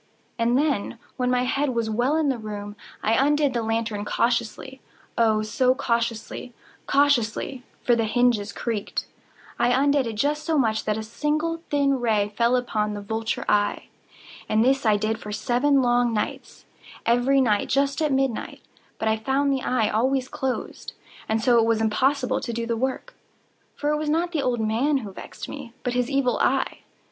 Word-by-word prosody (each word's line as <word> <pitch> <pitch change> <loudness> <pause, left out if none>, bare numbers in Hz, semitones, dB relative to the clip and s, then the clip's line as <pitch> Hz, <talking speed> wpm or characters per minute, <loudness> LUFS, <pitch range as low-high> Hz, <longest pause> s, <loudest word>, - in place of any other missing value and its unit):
And 235 +2 +2
then, 280 -9 0 0.2
when 250 -1 0
my 250 0 +2
head 265 0 0
was 230 -1 0
well 240 +7 +1
in 310 -3 +2
the 260 -3 -1
room, 205 -1 -6 0.3
I 220 - +2
undid 285 +2 +3
the 235 - 0
lantern 225 -2 -2
cautiously—oh, 235 -1 -1
so 255 +4 +2
cautiously—cautiously 240 +1 -1 0.2
(for 240 - +4
the 230 -1 +1
hinges 220 -3 +2
creaked)—I 230 +1 -4
undid 275 +1 +3
it 225 - -3
just 295 +7 0
so 320 -2 0
much 220 -5 +1
that 215 0 0
a 220 - -4
single 305 +8 -2
thin 280 -2 +2
ray 215 -4 +1
fell 235 +2 +3
upon 215 -4 -1
the 205 - -5
vulture 220 +2 -3
eye. 205 0 +1 0.6
And 220 +2 +3
this 270 -2 +2
I 210 -1 +4
did 215 +1 -1
for 210 - -7
seven 250 +6 +2
long 240 -1 +2
nights—every 245 +4 -1
night 215 -6 +2
just 275 +2 +1
at 305 -2 +1
midnight—but 265 -3 -3
I 220 0 +2
found 275 +5 +1
the 265 - -1
eye 245 -5 +1
always 255 +4 +1
closed; 265 -1 -4 0.4
and 220 0 0
so 240 -2 +5
it 225 - +3
was 230 -1 +2
impossible 255 +5 +1
to - - -4
do 230 0 -3
the 230 0 -1
work; 260 - -3 0.6
for 295 0 -1
it 300 - +1
was 305 0 -2
not 335 +3 +1
the 315 -4 0
old 245 -3 0
man 235 +7 +1
who 200 - -7
vexed - - -9
me, 275 -5 -8
but 245 - -1
his 250 0 0
Evil 275 -3 +1
Eye. - - +1
245 Hz, 170 wpm, -24 LUFS, 220-275 Hz, 0.6 s, so